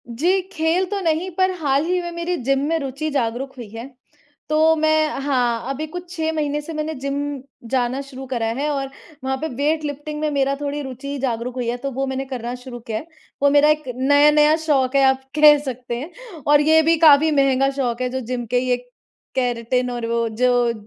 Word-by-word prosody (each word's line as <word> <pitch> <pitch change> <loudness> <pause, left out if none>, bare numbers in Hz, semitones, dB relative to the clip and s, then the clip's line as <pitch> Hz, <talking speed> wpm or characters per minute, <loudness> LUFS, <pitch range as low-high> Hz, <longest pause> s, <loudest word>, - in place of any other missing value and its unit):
जी, 345 +11 +1
खेल 330 +3 +1
तो 405 -1 -2
नहीं 335 +1 0
पर 375 0 +2
हाल 285 -1 +1
ही 360 +1 0
में 345 0 -5
मेरी 340 +1 -2
जिम 275 +2 +2
में 330 +1 +1
रुचि 280 +2 -4
जागरूक 260 0 -2
हुई 240 -3 -7
है, 230 +4 -8 0.6
तो 315 +1 +4
मैं 310 0 +2
हाँ, 250 -4 0
अभी 300 +3 -4
कुछ 355 +3 -8
6 320 -1 -1
महीने 295 -1 -1
से 325 +2 -8
मैंने 305 +1 -3
जिम 275 +1 -3 0.5
जाना 255 +1 0
शुरू 270 -1 -9
करा 240 -3 -2
है 295 +1 0
और 275 -2 -2 0.3
वहाँ 265 0 -1
पे 315 - -1
वेट 305 +4 0
लिफ्टिंग 295 +1 -5
में 305 - +1
मेरा 275 -1 +1
थोड़ी 290 0 -3
रूचि 275 +2 -6
जागरूक 240 0 -2
हुई 250 -2 -3
है, 240 - -2
तो 275 +2 -4
वो 270 +1 -2
मैंने 265 0 -3
करना 245 -2 -5
शुरू 250 -1 -9
किया 225 -1 -4
है। 320 - -12 0.4
वो 285 - +6
मेरा 290 +1 +5
एक 305 0 +2
नया-नया 295 +3 +5
शौक 270 -3 +2
है 275 - +5
आप 265 0 +2 0.2
कह 300 -1 +8
सकते 250 -2 -4
हैं 300 +7 -7 0.4
और 295 0 +6
ये 315 +1 +5
भी 325 +1 +3
काफ़ी 310 -1 +6
महँगा 275 -2 +3
शौक 255 -3 -2
है, 250 - 0
जो 260 +1 -3
जिम 245 0 -4
के 245 +2 +1
ये 250 0 +1 0.6
केराटिन 250 0 0
और 240 -1 -4
वो 230 0 0
जो 245 +1 +2
275 Hz, 210 wpm, -21 LUFS, 250-305 Hz, 0.6 s, कह